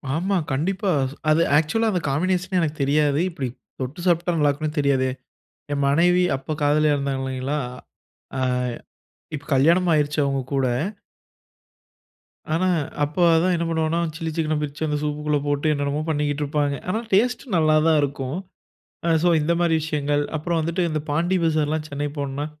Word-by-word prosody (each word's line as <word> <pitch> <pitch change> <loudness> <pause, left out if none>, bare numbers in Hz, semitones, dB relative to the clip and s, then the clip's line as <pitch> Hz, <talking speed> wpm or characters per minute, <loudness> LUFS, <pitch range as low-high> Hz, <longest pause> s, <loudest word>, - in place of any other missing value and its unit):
ஆமா. 190 +4 0 0.2
கண்டிப்பா. 190 +8 -1 0.4
அது 155 +2 +4 0.2
ஆக்சுவலா 220 +9 +1
அந்த 180 - -1
காம்பினேஷனே 180 +5 0
எனக்கு 155 -1 -2
தெரியாது. 145 +1 +2
இப்புடி 135 -7 -4 0.3
தொட்டு 130 +7 -5
சாப்ட்டா, 175 0 +2
நல்லாருக்குன்னு 150 +1 0
தெரியாதே. 135 -2 +2 0.6
என் 140 - 0
மனைவி 175 +5 +4
அப்ப 135 +3 -5
காதலியா 150 +1 +3
இருந்தாங்க 140 -1 -2
இல்லைங்களா! 130 +2 -2 0.8
ஆ - - -1 1.0
இப்ப 145 -2 -5
கல்யாணம் 170 +6 +4
ஆயிருச்சு 150 0 +1
அவுங்க 135 -1 0
கூட. 135 -1 +2 1.9
ஆனா. 185 +3 +1 0.4
அப்ப 150 +4 -3 0.2
அதான் 180 +3 +3
என்ன 170 - -1
பண்ணுவோன்னா, 160 +1 0 0.2
சில்லி 165 -1 -3
சிக்கன 155 -1 0
பிரிச்சு, 150 +2 -3
அந்த 150 0 0
சூப்‌க்கு 150 0 -3
உள்ள 150 - +3
போட்டு, 145 +2 +1
என்னென்னமோ 145 +1 -1
பண்ணிக்கிட்டு 145 -1 0
இருப்பாங்க. 145 -1 0
ஆனா 220 +5 0
டேஸ்ட் 245 +6 +2
நல்லா 155 -1 +4
தான் 155 -2 +4
இருக்கும். 140 +1 -3 0.7
அ - - +3
சோ, 175 - +4
இந்த 170 +3 +1
மாரி 170 -2 +3
விஷயங்கள். 145 -2 0
அப்புறம் 170 +2 -1
வந்துட்டு 170 +3 -1
இந்த 155 -1 -1
பாண்டி 170 +5 +1
பஜார்லாம் 155 -1 0
சென்னை 145 0 -2
போனோன்னா, 140 +1 -3
150 Hz, 150 wpm, -23 LUFS, 145-170 Hz, 1.9 s, அது